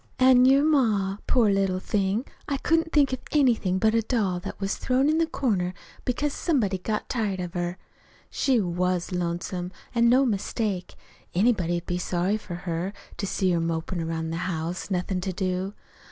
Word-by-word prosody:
"An' 255 -1 +6
your 270 +2 +5
ma 220 -10 +2
poor 230 -5 +4
little 195 -2 +1
thing! 200 +5 0 0.2
I 280 - 0
couldn't 325 +3 +1
think 280 -3 +3
of 260 - -2
anything 235 -10 +3
but 220 +2 +3
a 230 - +3
doll 210 -6 0
that - - -7
was 195 0 -1
thrown 260 +2 +2
in 310 +1 +3
the 330 - +2
corner 195 - -1 0.3
because 280 +4 0
somebody'd 210 - 0
got 215 -1 -2
tired 210 -7 -1
of 180 -1 -4
her. 175 0 -2 0.5
She 260 -4 +2
was 180 -1 -1
lonesome, 175 +1 -3 0.2
an' 235 -1 +4
no 260 +3 +5
mistake. 205 -3 -2 0.4
Anybody'd 180 -5 +2
be 180 -1 -2
sorry 180 +4 0
for 200 -5 -7
her, 175 +2 -3 0.2
to 200 - -2
see 185 -1 +1
her 170 - +2
mopin' 165 +1 -2
'round 160 0 -3
the - - -2
house, 165 +4 -4
nothin' 185 0 -1
to 190 0 -3
do. 185 +1 -2
195 Hz, 175 wpm, -26 LUFS, 180-245 Hz, 0.5 s, An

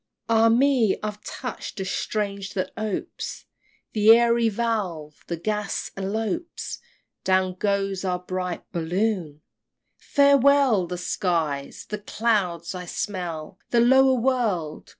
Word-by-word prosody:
XXXV. 230 - +3
Ah 225 +1 +5
me! 245 -2 +3
I've 210 0 -5
touch'd 250 -4 -6
a 190 - -2
string 200 +1 -2
that 185 - -2
opes 215 -2 -4 0.5
The 215 0 +3
airy 235 -1 +3
valve! 195 -9 -3
the 170 - -3
gas 210 +3 -2
elopes 220 - -3 0.4
Down 185 -1 +2
goes 195 0 -1
our 180 -1 0
bright 180 0 -4
Balloon! 175 -2 -1 0.6
Farewell 280 -7 +4
the 180 +1 -4
skies! 165 -6 -2
the 210 - -4
clouds! 200 -6 0
I 180 -1 -6
smell 175 -2 -4
The 240 - +3
lower 265 +2 +5
world! 220 -11 -1
200 Hz, 120 wpm, -24 LUFS, 180-230 Hz, 0.6 s, Ah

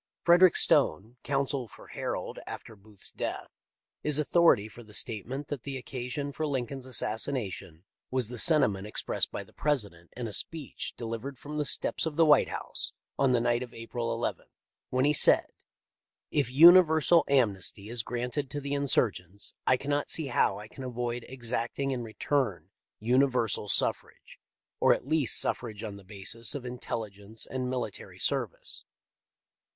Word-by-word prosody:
Frederick 175 0 +6
Stone, 110 +10 +2
counsel 135 -2 -1
for - - -15
Harold - - -4
after 115 - -8
Booth's 105 0 -7
death, - - -4 0.5
is 150 -1 +1
authority 155 -8 +4
for 115 +2 -12
the 105 -2 -9
statement 125 +7 -3
that 145 -4 -4
the 135 0 -5
occa 125 -1 -6
sion 140 +2 -3
for 155 +2 -3
Lincoln's 130 -1 -3
assassination 110 - -1 0.3
was 130 -3 +1
the 120 0 -5
sentiment 105 - +3
expressed 105 - -2
by - - -5
the - - -21
President 100 - -2
in 120 -2 -3
a 105 - -6
speech 155 +2 -2
delivered 115 +3 -5
from 150 +4 -6
the 150 - 0
steps 160 - +2
of 155 - -4
the 165 +1 +5
White 150 -1 +5
House - - -4 0.3
on 135 -2 +4
the 125 - +3
night 120 0 +1
of 125 -2 -8
April 115 0 -3
II, - - -7 0.5
when 130 +1 +1
he 145 - +3
said: - - +5 0.8
"If 145 -5 +1
universal 165 +2 +7
amnesty 105 -6 +1
is 120 +1 -1
granted 125 +4 -3
to 145 - -4
the 140 0 -4
insurgents 100 -9 0
I 130 - +5
cannot 145 +2 -2
see 155 -4 +2
how - - +2
I 105 +1 -9
can 135 - -10
avoid 120 -1 -4
exacting 125 +2 -3
in 130 -2 -2
return 110 - -2 0.3
universal 125 -3 +1
suffrage, - - -1 0.4
or - - +5
at - - -9
least 150 -3 +3
suffrage 110 -3 -2
on 105 -2 -6
the 100 - -14
basis 105 +6 -1
of 135 -3 -5
intelligence 110 -3 -4
and 130 -1 -3
military 125 -6 -5
service." - - -2
125 Hz, 160 wpm, -29 LUFS, 110-140 Hz, 0.8 s, universal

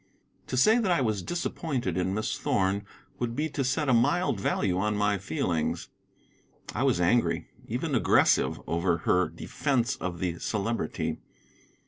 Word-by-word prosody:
To 130 - -2
say 220 - +5
that 215 -5 0
I 175 - +3
was 110 -6 0
disappointed 135 - -2
in 95 +1 0
Miss 110 +1 -1
Thorn 100 +1 0 0.3
would 120 -1 -2
be 155 +3 -1
to 145 -2 -2
set 135 +3 0
a 130 - +4
mild 140 - +2
value 95 -1 0
on 105 +1 0
my 100 -1 +1
feelings. 80 -3 -2 0.8
I - - -2
was - - +2
angry, 90 +8 +2 0.2
even - - -2
aggressive, - - +3
over 85 0 +1
her 90 -3 +3
defence 125 -5 -1
of 90 -2 -4
the 85 -1 -2
Celebrity. 110 +2 -2
105 Hz, 150 wpm, -28 LUFS, 95-130 Hz, 0.8 s, say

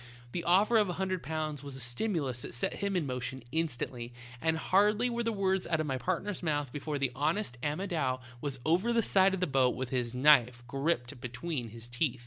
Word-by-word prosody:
The 170 - -3
offer 200 +6 +5
of 205 -3 +2
a - - -1
hundred 185 -1 -1
pounds 155 -2 -3
was 140 -2 -7
a - - -8
stimulus 130 - -1
that - - -6
set 120 - 0
him 200 -1 -1
in 175 -4 +1
motion 130 0 -4
instantly, 125 -6 -3 0.3
and 160 0 +2
hardly 210 +8 +3
were 235 0 -1
the 230 -1 0
words 190 -3 0
out 165 - +1
of 155 - 0
my 135 -3 -1
partner's 185 +5 -2
mouth 145 -5 -1
before 145 0 -3
the 135 -2 0
= - - -20
honest 155 +2 0
Amodou 150 -4 -1 0.2
was 140 -2 -3
over 185 +9 +3
the 230 -1 +3
side 190 -1 +4
of 190 - -6
the - - +3
boat 130 -4 +2
with 130 -1 -3
his 125 -2 -1
knife 125 -3 +5
gripped 135 -2 -1
between 125 0 -4
his 115 +1 -9
teeth. 125 0 -1
150 Hz, 215 wpm, -31 LUFS, 130-185 Hz, 0.3 s, offer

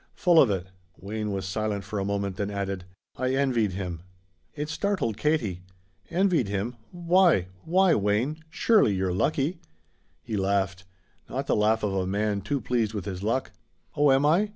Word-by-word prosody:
"Full 175 -3 +5
of 125 - +4
it." 95 -3 -1 0.3
Wayne 105 +2 -4
was 95 -1 -3
silent 105 +1 -2
for 105 - -4
a - - -1
moment, 100 -2 -2
then 100 0 -2
added: 100 -2 -3 0.3
"I 130 +1 0
envied 120 -8 +1
him." 90 -3 -4 0.5
It 150 0 -3
startled 160 - -1
Katie. 115 - 0 0.5
"Envied 175 - +2
him? 100 +5 -2 0.2
Why 175 - +3 0.2
why, 185 +1 +4
Wayne? 110 +9 0
Surely 200 - +3
you're 95 -1 0
lucky." 150 - 0 0.6
He 110 - -3
laughed: 95 -1 0 0.4
not - - -3
the - - +1
laugh 110 +1 +2
of 100 -2 0
a 95 -1 -1
man 100 +1 0
too 140 +8 -1
pleased 115 -2 -1
with 100 -3 -4
his 95 -3 -5
luck. 115 +6 -1 0.4
"Oh, 145 -1 +4
am 135 +2 +4
I? 180 +8 +3
110 Hz, 170 wpm, -26 LUFS, 100-150 Hz, 0.6 s, Full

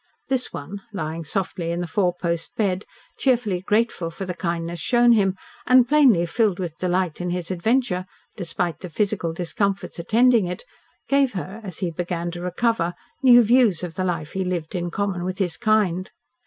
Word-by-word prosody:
This 260 -2 0
one, 190 +8 -7
lying 165 -4 -4
softly 175 0 -2
in 170 +1 -1
the 175 - -2
four 180 +1 +1
post 170 -1 -2
bed, 195 -2 0 0.3
cheerfully 235 -9 +1
grateful 210 -4 0
for 190 +4 -6
the 180 - -3
kindness 170 -1 -3
shown 240 -1 +4
him, 195 -4 +3 0.3
and 255 -1 +6
plainly 260 - +5
filled 205 +1 +1
with 170 -3 -5
delight 180 -2 0
in 180 - -2
his 175 0 -3
adventure, 185 0 0 0.3
despite 175 -3 -3
the 180 - -7
physical 195 -2 -1
discomforts 190 +3 -2
attending 230 +3 +4
it, 180 - -5 0.4
gave 275 -3 +3
her, 195 +3 -6
as 185 -5 -6
he 170 - -2
began 175 0 -3
to 175 0 -7
recover, 180 -1 0 0.3
new 245 -2 +8
views 225 -6 +3
of 175 -2 -4
the 185 - -2
life 165 -4 -2
he 190 - -2
lived 175 -4 -3
in 175 -1 -2
common 190 -1 -2
with 185 +1 -3
his 180 -5 -1
kind. 210 -6 +1
185 Hz, 180 wpm, -23 LUFS, 175-215 Hz, 0.4 s, new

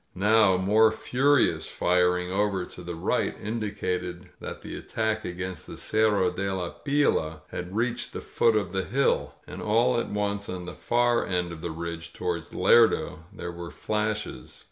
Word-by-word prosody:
Now 105 -1 +4
more 105 +4 +4
furious 130 +4 +2
firing 90 0 +1
over 100 -2 0
to - - -11
the 85 -1 -6
right 80 - 0
indicated 95 -5 -3
that - - -7
the - - -6
attack 110 0 -2
againat 90 -1 -5
the - - -8
Cerro 105 -4 +2
de 95 +2 -2
la 90 -2 -2
Pila 85 - 0
had 90 +2 -5
reached 115 +2 -1
the - - -5
foot 115 -2 +2
of 100 -5 0
the 95 0 -1
hill. 140 +2 +1
And - - -8
all 120 +3 +3
at - - -3
once 100 0 -2
on 90 -1 -5
the - - -6
far 120 0 +2
end 90 -2 -1
of 80 -2 -8
the 85 - -3
ridge 85 0 -6
toward 85 -2 -3
Lerdo, 95 -5 +3
there 90 - -6
were 85 0 -7
flashes. 105 +1 -3
95 Hz, 165 wpm, -27 LUFS, 90-110 Hz, -, Now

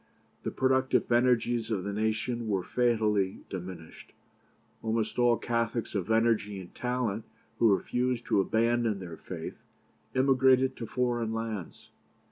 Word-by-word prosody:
The - - -2
productive 130 -1 +1
energies 120 -1 +2
of 100 -5 -1
the 100 +1 -3
nation 110 +2 -1
were 95 -4 0
fatally 105 -4 +1
diminished. 90 -3 -8 0.7
Almost 110 0 -1
all 120 -1 +4
Catholics 115 -1 -1
of 100 -3 -2
energy 110 -3 +2
and 90 -2 -11
talent 125 -4 -2 0.4
who 110 -4 +6
refused 125 -1 -1
to 100 - +3
abandon 115 +1 +1
their 85 -4 -8
faith - - -7 0.6
emigrated 130 0 +4
to 115 - -5
foreign 120 -2 -1
lands. 110 -5 -5
115 Hz, 125 wpm, -29 LUFS, 105-125 Hz, 0.7 s, who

